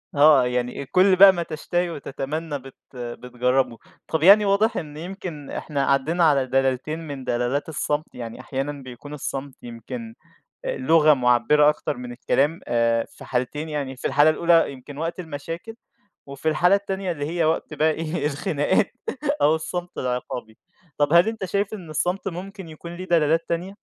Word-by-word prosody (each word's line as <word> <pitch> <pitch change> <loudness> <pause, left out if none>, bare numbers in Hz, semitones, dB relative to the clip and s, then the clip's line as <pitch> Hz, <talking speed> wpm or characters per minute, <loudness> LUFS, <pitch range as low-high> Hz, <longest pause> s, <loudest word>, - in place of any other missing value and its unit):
آه، 145 -3 +6
يعني 125 +2 -2
كل 185 +6 +4
بقى 195 +1 +9
ما 175 -2 -2
تشتهي 175 +2 -2
وتتمنى 145 0 -4
بت 135 0 -13 0.2
بتجربه. 125 0 -1 0.3
طَب 160 -1 -1
يعني 205 +3 +8
واضح 205 +3 +2
إن 150 -3 -6
يمكن 170 -4 -7
إحنا 145 -3 -2
عدّينا 145 +6 +2
على 140 -4 +4
دلالتين 135 +4 0
من 140 -3 -6
دلالات 125 +5 -1
الصمت، 150 0 -2
يعني 115 -1 -7
أحيانًا 135 +3 -3
بيكون 130 +3 -10
الصمت 135 -1 -5
يمكن 225 - -8 0.5
لغة 165 - +4
مُعبِّرة 125 +4 +4
أكتر 150 - -1
من 125 0 -7
الكلام 140 +6 0
آآ، 115 -1 +2
في - - -13
حالتين 135 +5 -2
يعني 140 -3 -4
في - - -5
الحالة 145 +2 +5
الأولى 165 -1 +3
يمكن 135 +2 -11
وقت 165 +3 -3
المشاكل، 165 +6 -7 0.5
وفي 140 +3 -4
الحالة 175 +5 +4
التانية 195 -2 -2
اللي 145 -3 -4
هي 170 +1 0
وقت 160 0 0
بقي 155 +1 +2
إيه، 155 0 -2
الخناقات 150 +7 0 0.5
أو 150 +2 +5
الصمت 175 +2 -5
العقابي، 125 -3 -4 0.4
طَب 145 0 +2
هل 170 +5 +6
أنت 220 -3 -4
شايف 200 +3 -1
إن 180 -7 -9
الصمت 180 +6 -1
ممكن 190 +1 -8
يكون 170 +2 -9
ليه 185 - -6
دلالات 165 -2 +2
تانية؟ 175 +4 -3
150 Hz, 160 wpm, -23 LUFS, 135-175 Hz, 0.5 s, بقى